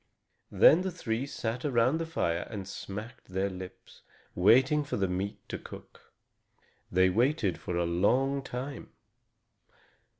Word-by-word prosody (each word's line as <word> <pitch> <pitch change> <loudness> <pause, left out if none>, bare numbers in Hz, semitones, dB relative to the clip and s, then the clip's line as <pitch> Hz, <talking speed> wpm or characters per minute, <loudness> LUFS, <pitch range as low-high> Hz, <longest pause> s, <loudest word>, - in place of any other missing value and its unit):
Then 165 - +6
the 190 - -1
three 130 -7 -3
sat 120 -2 -4
around 130 +2 +2
the 165 - -3
fire 85 - -1
and 100 -4 -6
smacked 105 +4 -8
their 95 +1 -2
lips, 90 0 -10 0.3
waiting 130 - +4
for 145 - -3
the 100 -1 +1
meat 95 +3 -3
to - - -4
cook. - - -13 0.8
They 95 +1 +4
waited 115 - +1
for 90 - -3
a 85 - +1
long 125 +11 +2
time. 135 +1 -6
115 Hz, 135 wpm, -29 LUFS, 95-135 Hz, 0.8 s, Then